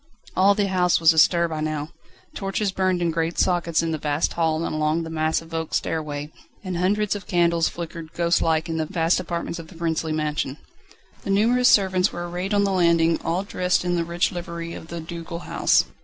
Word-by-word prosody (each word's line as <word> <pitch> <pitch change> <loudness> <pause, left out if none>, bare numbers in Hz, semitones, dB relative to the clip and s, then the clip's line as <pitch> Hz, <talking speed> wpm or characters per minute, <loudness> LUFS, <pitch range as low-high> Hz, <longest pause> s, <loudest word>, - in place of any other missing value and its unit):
All 195 +2 +5
the 205 -1 +1
house 180 -2 +2
was 165 0 +6
astir 170 +2 +4
by 160 -2 -4
now. 155 -1 -3 0.4
Torches 195 +1 -2
burned 185 -2 0
in 170 - +1
great 165 +1 -2
sockets 170 -3 +1
in 165 - -1
the 155 - -2
vast 145 +1 0
hall 160 -1 0
and - - -3
along 155 +2 0
the 160 - -7
massive 160 +1 -1
oak 160 -1 -2
stairway, 150 -1 -3 0.3
and 185 -2 -4
hundreds 205 +3 +1
of 205 - -8
candles 170 -2 +2
flickered 165 -1 -7
ghostlike 165 -2 +1
in 165 -1 -3
the 160 -1 -1
vast 165 +2 +1
apartments 170 -1 -4
of 165 - -9
the 180 - -15
princely 165 -1 -2
mansion. 150 -2 -2 0.6
The - - -7
numerous 235 +5 +4
servants 190 -1 +3
were 175 0 -5
arrayed 180 +4 -2
on 200 - +3
the 200 - +1
landing, 170 -2 +3
all 175 +3 -1
dressed 180 -2 0
in 175 0 +1
the 170 - 0
rich 170 +1 0
livery 170 -2 -6
of - - -9
the 170 0 -6
ducal 170 +1 -7
house. - - +2
170 Hz, 200 wpm, -23 LUFS, 160-180 Hz, 0.6 s, was